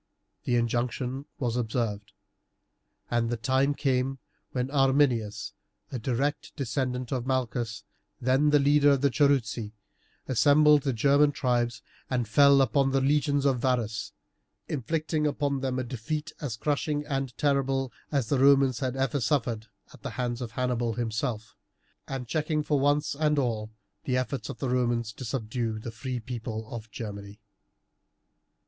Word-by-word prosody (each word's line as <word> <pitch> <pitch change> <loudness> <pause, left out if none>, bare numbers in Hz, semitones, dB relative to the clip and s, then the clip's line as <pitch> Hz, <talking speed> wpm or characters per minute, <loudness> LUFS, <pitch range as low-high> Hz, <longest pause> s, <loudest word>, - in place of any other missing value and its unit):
The 125 - +1
injunction 125 +3 -1
was 120 -6 -1
observed, 110 -4 -2 1.0
and 120 -1 +1
the 120 - -1
time 130 +4 +1
came 135 -1 0 0.3
when 130 +1 -2
Arminius, 130 -7 +2 0.4
a 130 - -3
direct 135 +5 -2
descendant 130 -2 -2
of 130 -2 -2
Malchus, 120 -4 -1 0.4
then 130 +4 +3
the 150 - +5
leader 145 +1 +4
of 135 - 0
the 140 -1 +3
Cherusei, 120 -6 +1 0.5
assembled 145 +3 +5
the 135 - 0
German 140 +5 +4
tribes 120 -4 0 0.3
and 125 -3 0
fell 140 +3 +6
upon 135 0 +2
the 135 0 +2
legions 145 +1 +2
of 135 -3 +2
Varus, 115 -4 -1 0.6
inflicting 155 +2 -1
upon 140 -1 -1
them 130 -1 -2
a 130 - -1
defeat 150 +6 -4
as 125 -7 -3
crushing 150 +1 -1
and 135 -5 -3
terrible 135 -2 +1 0.2
as 140 -5 +1
the 140 - +2
Romans 135 -3 +5
had 130 -1 -2
ever 135 +1 0
suffered 115 -3 0 0.3
at - - -15
the - - -4
hands 120 0 -2
of 115 -2 -5
Hannibal 120 -2 0
himself, 115 0 -3 0.5
and 130 -2 -5
checking 155 +2 0
for 145 -1 +1
once 145 +2 +2
and 150 +1 +1
all 115 -5 -1 0.4
the 125 -1 +1
efforts 130 -3 -3
of - - -6
the 130 - -2
Romans 120 -2 0
to 130 - -9
subdue 115 -2 -2
the 110 +1 -6
free 125 +2 -4
people 115 -2 -5
of 110 -2 -7
Germany. 100 -2 -7
130 Hz, 150 wpm, -28 LUFS, 115-140 Hz, 1.0 s, fell